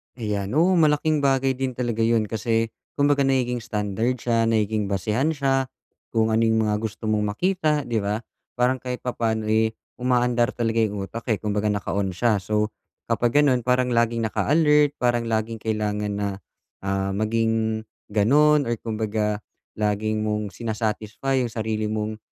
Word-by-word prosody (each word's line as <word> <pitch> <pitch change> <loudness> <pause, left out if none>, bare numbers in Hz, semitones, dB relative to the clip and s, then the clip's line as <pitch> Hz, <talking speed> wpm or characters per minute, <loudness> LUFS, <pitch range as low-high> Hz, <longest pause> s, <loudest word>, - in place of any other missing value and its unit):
Ayan. 105 -2 -3
Oo, 175 +4 +4
malaking 155 0 +3
bagay 135 -1 +2
din 130 -1 -2
talaga 120 -2 -2
yun 115 -1 +3
kasi, 115 0 0 0.2
kumbaga 145 -1 +3
nagiging 125 -2 +1
standard 110 +1 -1
siya, 115 -2 +1
nagiging 110 -2 +1
basehan 110 - 0
siya, 135 -2 +1 0.5
kung 110 0 +3
ano 110 +1 +3
yung 110 0 +2
mga 105 -1 +1
gusto 110 +1 -6
mong 105 -1 0
makita, 155 - +1
'di 120 -3 -1
ba? 105 +3 -2 0.3
Parang 125 +1 +2
kahit 125 0 -5
papa'no, 115 -3 -1
eh, 110 0 +2 0.2
umaandar 125 0 +1
talaga 115 -1 0
yung 105 -3 -1
utak, 115 +5 -8
eh. 110 - +2
Kumbaga, 105 0 -1
naka-on 100 -1 -1
siya. 110 0 +2
So, 105 +2 0 0.4
kapag 120 +3 +2
ganun 130 -4 +3
parang 125 0 +2
laging 115 -1 +1
naka-alert, 150 +4 +3
parang 120 -1 +1
laging 110 0 -1
kailangan 105 -1 -1
na, 100 0 -1 0.5
ah, 95 0 -1
maging 110 +1 0 0.3
ganun, 145 +9 +4
or 120 - 0
kumbaga, 110 -1 -2 0.4
lagi 105 +1 0
mong 105 -1 -1
sina-satisfy 110 +4 -2
yung 115 - -6
sarili 110 -1 -2
mong, 110 0 -2
115 Hz, 155 wpm, -24 LUFS, 105-125 Hz, 0.5 s, Oo